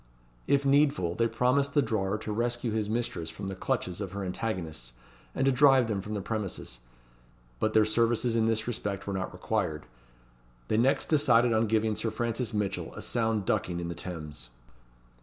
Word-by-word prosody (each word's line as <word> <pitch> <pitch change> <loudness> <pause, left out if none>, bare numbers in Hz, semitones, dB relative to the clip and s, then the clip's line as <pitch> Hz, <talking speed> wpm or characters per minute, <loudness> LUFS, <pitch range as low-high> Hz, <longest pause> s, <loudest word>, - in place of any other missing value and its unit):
If 140 0 +3
needful, 140 - +3
they 115 +5 +2
promised 125 +5 +1
the 145 - +6
drawer 105 -3 0
to 110 0 -5
rescue 120 +2 -1
his 105 -1 -1
mistress 110 -8 -2
from 90 +4 -6
the 95 - -4
clutches 90 0 -2
of 95 -2 -5
her 100 0 -3
antagonists, 85 - -4 0.4
and 135 - +1
to 135 - +5
drive 135 -2 +5
them 105 -3 -1
from 105 +2 -5
the 100 - -2
premises. 100 - -4 0.8
But 110 - +1
their 110 -1 +5
services 115 +2 +1
in 110 -1 +3
this 110 -1 +1
respect 100 -4 -3
were 100 - -3
not 95 -1 -3
required. 90 -4 -2 0.8
They 110 - +2
next 125 +4 +3
decided 125 -6 +4
on 110 0 +2
giving 110 0 +1
Sir 110 +2 -1
Francis 115 +1 -2
Mitchell 105 -2 -2
a - - -6
sound 110 -4 0
ducking 85 -1 0
in 85 0 -4
the - - -3
Thames. 75 -8 -7
110 Hz, 180 wpm, -29 LUFS, 95-120 Hz, 0.8 s, the